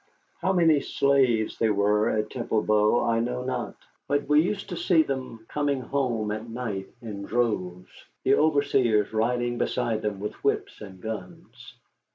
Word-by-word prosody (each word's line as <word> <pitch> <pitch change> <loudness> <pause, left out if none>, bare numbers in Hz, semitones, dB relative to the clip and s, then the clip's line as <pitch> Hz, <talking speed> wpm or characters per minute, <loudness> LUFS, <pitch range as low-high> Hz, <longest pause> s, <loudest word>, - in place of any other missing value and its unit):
How 190 - +1
many 165 -5 +4
slaves 130 -7 +1
there 110 -2 +2
were 105 +2 +2
at 105 0 -1
Temple 115 -3 -1
Bow 105 +2 +3
I 115 0 +2
know 125 +2 -2
not, 130 - -3 0.3
but 145 0 0
we 150 +1 +5
used 200 +4 -3
to 180 - -4
see 165 -1 +3
them 130 -5 -5
coming 145 -2 -1
home 125 -6 -1
at 110 +2 -5
night 115 -5 -4 0.2
in 105 -3 -6
droves, 95 -5 -2 0.3
the - - +4
overseers 135 -9 +2
riding 120 +2 0
beside 110 -2 -1
them 105 -2 -3
with 105 +1 -4
whips - - -1
and 95 -3 -10
guns. 110 -3 -8
115 Hz, 160 wpm, -26 LUFS, 105-140 Hz, 0.3 s, we